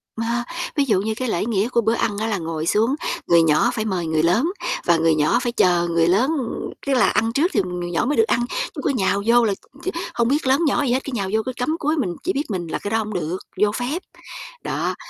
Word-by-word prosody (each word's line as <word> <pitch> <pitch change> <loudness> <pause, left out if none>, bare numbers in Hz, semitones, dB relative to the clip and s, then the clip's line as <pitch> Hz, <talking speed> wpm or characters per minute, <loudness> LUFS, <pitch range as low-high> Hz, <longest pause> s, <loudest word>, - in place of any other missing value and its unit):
Mà 235 +2 -1 0.3
ví 290 - +3
dụ 205 -6 +3
như 220 +2 -1
cái 255 +2 -3
lễ 190 0 0
nghĩa 215 -1 +1
của 235 -2 +2
bữa 225 +1 +1
ăn 210 -3 -1
á 220 +1 -1
là 210 - 0
ngồi 165 -2 -4
xuống, 225 +10 +2 0.3
người 170 -1 +6
nhỏ 160 +10 +3
phải 220 -3 -2
mời 185 -5 -1
người 160 -1 +1
lớn, 225 - +2 0.3
và 170 - +4
người 165 -1 +3
nhỏ 155 +11 +2
phải 240 - -1
chờ 175 -6 +2
người 165 -1 +2
lớn, 205 +10 +3
ừm, 250 -5 -4 0.2
tức 275 - +2
là 250 - +4
ăn 225 +1 +1
trước 320 +9 +2
thì - - +3
người 175 -1 -4
nhỏ 170 - 0
mới 290 +4 0
được 450 - +6
ăn, 240 - +1 0.3
chứ - - -4
cứ - - +1
nhào 200 -6 +1
vô 235 0 +5
là 205 - +1 0.3
t - - -6 0.3
hông 235 -1 +1
biết 285 +1 0
lớn 265 +3 +4
nhỏ 290 - +2
gì 250 -3 +1
hết, 260 - 0
cứ 275 - -6
nhào 200 -4 -2
vô 220 - +3
cứ 255 - -2
cắm 285 +6 -1
cúi 305 +1 0
mình 185 - -1
chỉ 370 - 0
biết 280 - -1
mình 175 -4 -3
là - - -3
cái 205 - -5
đó 225 - +2
hổng 215 -1 -3
được, 175 0 -2 0.2
vô 210 0 +4
phép, 255 - -3 0.6
đó. - - -2
220 Hz, 270 wpm, -22 LUFS, 180-250 Hz, 0.6 s, người